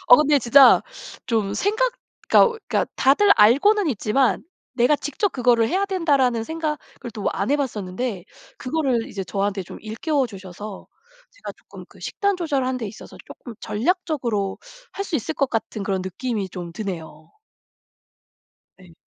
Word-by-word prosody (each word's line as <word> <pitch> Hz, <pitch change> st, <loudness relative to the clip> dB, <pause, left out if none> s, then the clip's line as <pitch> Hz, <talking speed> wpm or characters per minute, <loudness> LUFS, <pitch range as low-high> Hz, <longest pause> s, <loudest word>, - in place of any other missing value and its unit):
어 245 Hz, -, +10 dB
근데 300 Hz, 0 st, +4 dB
진짜 265 Hz, +2 st, +7 dB, 0.4 s
좀 210 Hz, -4 st, -1 dB
생각 445 Hz, +5 st, +1 dB, 0.4 s
그러니까 465 Hz, -2 st, +5 dB
그러니까 -, -, +1 dB
다들 340 Hz, +10 st, +5 dB
알고는 290 Hz, -, +5 dB
있지만 250 Hz, +1 st, +1 dB, 0.3 s
'내가 255 Hz, +4 st, +3 dB
직접 300 Hz, +9 st, -2 dB
그거를 240 Hz, -3 st, +3 dB
해야 385 Hz, -, 0 dB
된다.'라는 280 Hz, -, +1 dB
생각을 315 Hz, +1 st, -2 dB, 0.4 s
또 210 Hz, -, -5 dB
안 195 Hz, +5 st, -2 dB
해 290 Hz, -, +4 dB
봤었는데 210 Hz, -5 st, -3 dB, 0.3 s
그거를 255 Hz, -4 st, -1 dB
이제 195 Hz, -2 st, -5 dB
저한테 195 Hz, 0 st, -2 dB
좀 -, -, -11 dB
일깨워 260 Hz, +6 st, -1 dB
주셔서 195 Hz, -1 st, -9 dB, 0.4 s
제가 -, -, -9 dB
쪼끔 -, -, -14 dB
그 -, -, -19 dB
식단 400 Hz, -2 st, -1 dB
조절하는 275 Hz, -7 st, -1 dB
데 230 Hz, -4 st, -4 dB
있어서 205 Hz, -, -11 dB
쪼끔 240 Hz, -, -11 dB
전략적으로 240 Hz, -, -1 dB, 0.3 s
할 395 Hz, -, -4 dB
수 350 Hz, -, -1 dB
있을 285 Hz, +4 st, -3 dB
것 275 Hz, -, 0 dB
같은 225 Hz, -2 st, -3 dB
그런 190 Hz, -2 st, -1 dB
느낌이 200 Hz, +1 st, -4 dB
좀 175 Hz, -1 st, -7 dB
드네요. 165 Hz, -5 st, -7 dB, 1.5 s
예. 180 Hz, -3 st, -17 dB
245 Hz, 320 characters per minute, -22 LUFS, 205-300 Hz, 1.5 s, 어